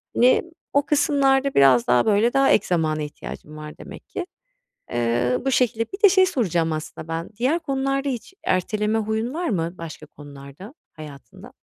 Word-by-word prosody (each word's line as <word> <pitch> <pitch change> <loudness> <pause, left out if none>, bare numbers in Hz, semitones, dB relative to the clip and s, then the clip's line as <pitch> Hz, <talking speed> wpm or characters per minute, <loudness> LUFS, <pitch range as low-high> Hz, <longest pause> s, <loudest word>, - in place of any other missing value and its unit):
Hani, 250 +2 +4 0.3
o 285 0 +2
kısımlarda 275 -2 +2
biraz 130 -3 +5
daha, 125 - +3
böyle, 215 +3 +2
daha 270 0 +3
ek - - +3
zamana 155 -3 0
ihtiyacın 150 +1 -9
var 150 0 -9
demek - - -12
ki. 365 -2 -5 0.6
Eee, 120 +1 0
bu 270 - +1
şekilde. 230 -3 +1
Bir 405 +3 -8
de 410 - +9
şey 375 0 +5
soracağım 175 - 0
aslında 155 0 -7
ben, 165 +1 -4
diğer 270 +8 +1
konularda 275 -2 -1
hiç 250 +7 -6
erteleme 210 +4 0
huyun 220 +3 -2
var 345 +2 -2
mı, 170 -4 -2
başka 160 -2 -9
konularda 145 - -12 0.2
hayatında? 150 -3 -12
210 Hz, 165 wpm, -23 LUFS, -, 0.6 s, de